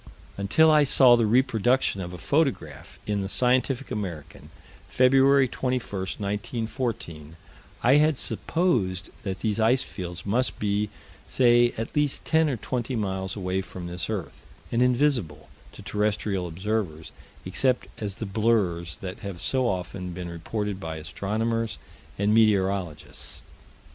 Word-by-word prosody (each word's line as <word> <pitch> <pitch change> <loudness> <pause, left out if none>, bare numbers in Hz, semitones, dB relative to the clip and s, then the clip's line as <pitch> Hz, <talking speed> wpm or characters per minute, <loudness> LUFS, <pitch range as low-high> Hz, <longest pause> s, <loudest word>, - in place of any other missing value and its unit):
Until 110 +12 +4
I 150 -1 +6
saw 130 -3 +6
the 115 -2 +2
reproduction 120 -2 +2
of 90 -1 -5
a 90 - -7
photograph 85 - -1
in 105 -1 -1
the 95 - -3
Scientific 130 +3 +1
American, 90 - -6 0.4
Feb. 135 +1 +4
21, 130 -1 -1
1914, 100 - -4 0.5
I 130 +4 +6
had 155 -1 +3
supposed 105 - -1
that 95 -1 -5
these 110 -1 -1
ice 115 +4 +3
fields 90 -3 -7
must 120 +6 0
be, 105 0 0 0.4
say, 120 -1 +4
at 115 +1 -5
least 145 -2 0
ten 160 -1 +3
or 130 - -2
twenty 120 +4 -3
miles 95 -3 -2
away 95 -1 -2
from 90 -1 -9
this 90 +2 -4
earth, 105 -6 -5 0.3
and 115 - +1
invisible, 120 - +1 0.2
to - - -11
terrestrial 105 -3 -1
observers, 90 -2 -3 0.3
except 130 -2 +1 0.2
as 100 -2 -3
the 110 - -5
blurs 95 -6 0
that 95 0 -6
have 100 -5 -7
so 125 +7 0
often 90 -2 -4
been 90 0 -6
reported 100 +4 -4
by 80 -4 -5
astronomers 110 +8 -2 0.4
and 100 +2 +2
meteorologists. 95 -7 0
105 Hz, 135 wpm, -26 LUFS, 95-125 Hz, 0.5 s, I